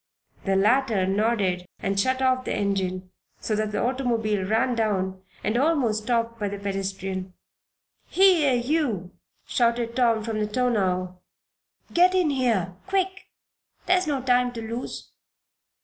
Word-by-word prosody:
The 195 -1 +1
latter 215 0 +3
nodded 195 -3 0
and 195 0 -1
shut 260 +5 +1
off 255 0 +2
the - - -2
engine 190 -2 -2 0.3
so 220 - -2
that 215 0 -1
the - - -1
automobile 235 -5 0
ran 230 +5 +2
down 190 -5 -1 0.2
and 215 +3 0
almost 250 -7 +1
stopped 230 -1 0
by 205 -1 -1
this 200 0 -7
pedestrian. 195 -1 -4 0.7
"Here, 340 -8 +4
you!" 240 - -1 0.3
shouted 235 -1 0
Tom, 230 -3 +2
from 220 -1 -3
the 210 - 0
tonneau. 190 -6 0 0.7
"Get 360 +2 +5
in 355 -5 +2
here 230 -10 0
quick! 380 -1 -1 0.6
There's 365 -1 +2
no 275 -4 -1
time 250 -1 +2
to 230 - -6
lose!" 235 +3 -6
230 Hz, 135 wpm, -25 LUFS, 195-255 Hz, 0.7 s, Get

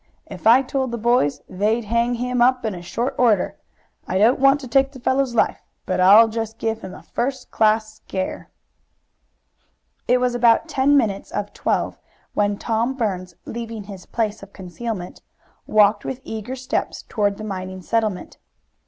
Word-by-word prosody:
If - - -5
I 245 +4 +7
told 265 0 -2
the 235 - -3
boys 230 - +1
they'd 215 +5 0
hang 235 +3 +1
him 250 +1 -1
up 250 0 +3
in 190 -5 -3
short 235 +8 -2
order. 225 -6 +2 0.5
I 185 - -1
don't 225 +6 +4
want 275 +1 +5
to 260 - -7
take 270 +3 +3
the 265 - -12
fellow's 260 0 0
life, - - +1 0.2
but 185 - -1
I'll 205 +5 +8
give 225 0 -3
him 190 - -8
a - - -13
first 260 +2 -3
class 215 0 +1
scare." 190 -3 -5 1.6
It 250 +1 +4
was 250 -1 +1
about 240 +4 +4
ten 285 -1 +3
minutes 210 -7 0
of 205 0 -4
twelve - - -1 0.3
when 205 -1 +1
Tom 230 +4 -1
Burns, 185 -7 -3
leaving 230 -2 -6
his 195 -2 -11
place 220 -2 -2
of 195 0 -13
concealment, 190 0 -6 0.5
walked 210 -1 +4
with 260 -1 -5
eager 220 +3 -5
steps 255 0 -3
toward 205 -2 -1
the 215 - -7
mining 185 -2 -6
settlement. 215 -4 -2
225 Hz, 160 wpm, -22 LUFS, 205-245 Hz, 1.6 s, I'll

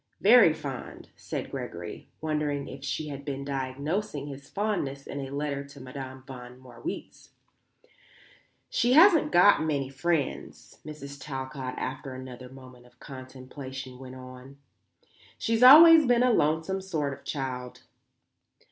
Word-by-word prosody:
"Very 215 -4 +7
fond," 140 -4 -7
said - - -6
Gregory, - - -7
wondering 150 -2 -2
if 135 0 -9
she 150 +2 -3
had 140 -1 -7
been 140 -1 -5
diagnosing 140 +5 -3
his 140 -1 -10
fondness 185 -10 -2
in 140 - -6
a 135 - -6
letter 140 0 -3
to 140 0 -14
Madame 130 0 -8
von 125 -2 -11
Marwitz. 125 -2 -8 1.4
"She 240 +2 +1
hasn't 330 +2 +6
got 180 +4 +6
many 145 -4 -1
friends," 145 +3 -3
Mrs. 140 -2 -9
Talcott, 130 -2 -5
after 130 +1 -5
another 130 -1 -9
moment 130 -2 -14
of 125 0 -26
contemplation, 130 0 -9
went 130 -1 -10
on. 130 +1 -12 0.8
"She's 225 +1 0
always 315 +3 +10
been 245 0 +4
a 250 -1 +4
lonesome 160 +3 +1
sort 155 -7 -2
of - - -13
child." 130 -3 -5
140 Hz, 130 wpm, -27 LUFS, 130-160 Hz, 1.4 s, always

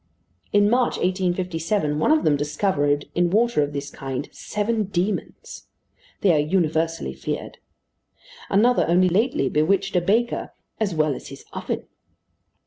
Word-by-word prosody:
In 205 0 +4
March, 245 +3 +2
1857, 180 -3 -1
one 155 - +3
of 310 0 +3
them 150 - +3
discovered, 145 -1 0
in 175 0 +2
water 225 -2 +2
of 145 0 -1
this 140 0 -5
kind, 135 -1 -5
seven 215 +1 -2
demons. 190 +2 -4 0.5
They 190 -4 +4
are 155 - +3
universally 160 - 0
feared. 65 - -5 0.9
Another 230 +5 +3
only 180 +2 +4
lately 200 - +1
bewitched 195 +8 +1
a 180 - +4
baker 225 +7 0 0.3
"as 200 -6 -1
well 155 -2 +2
as - - -8
his 135 0 -11
oven." - - -4
175 Hz, 135 wpm, -23 LUFS, 150-205 Hz, 0.9 s, In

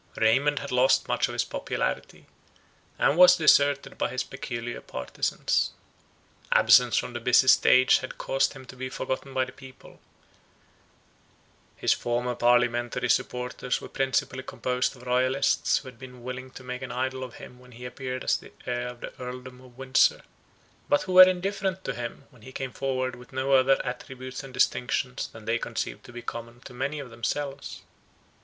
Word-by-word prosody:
Raymond 135 +7 +3
had 140 - -4
lost 125 +1 +3
much - - +1
of - - -7
his - - +1
popularity, - - -4 0.7
and 140 - +3
was 180 0 +9
deserted 145 -4 +3
by - - 0
his 130 - -2
peculiar 120 -2 -6
partizans. 65 - -1 0.8
Absence 125 -2 +6
from 125 - -2
the 120 - -4
busy 125 +3 +4
stage 130 0 +6
had 130 - -8
caused 135 +1 0
him 135 -2 -12
to 130 - -12
be 130 0 -5
forgotten 130 +1 -4
by 130 -1 +1
the 130 - -11
people; 130 -1 -15 1.8
his - - +2
former 120 +1 -2
parliamentary 120 0 +2
supporters 125 0 -1
were - - -9
principally 130 -1 -1
composed 125 0 -2
of 125 - -15
royalists, 130 +2 +2
who 135 - -7
had 125 -2 -17
been 125 -2 -11
willing 130 +1 -6
to 130 - -12
make 125 0 -6
an 130 - -6
idol 130 +1 -2
of 125 -2 -8
him 125 - -12
when 125 0 -17
he 125 +2 -10
appeared 130 0 -5
as - - +2
the - - -14
heir 125 0 -2
of 125 -1 -9
the - - -7
Earldom 125 0 -8
of 125 -1 -17
Windsor; 135 0 +3 0.7
but 145 - +3
who 185 - -4
were 185 0 +10
indifferent 190 +1 -2
to 135 - -3
him, 120 +3 -7
when 125 -4 -20
he 130 - -11
came 130 -1 -5
forward 130 -2 -2
with 125 0 -15
no 130 +1 0
other 135 0 +5
attributes 130 +2 -6
and 135 - -10
distinctions 125 0 0
than 110 - -13
they 115 +1 0
conceived - - -4
to - - -12
be 120 0 -9
common 115 +1 -7
to - - -12
many 135 +4 -3
among 135 -4 -8
themselves. 135 +5 -4
130 Hz, 175 wpm, -27 LUFS, 125-135 Hz, 1.8 s, were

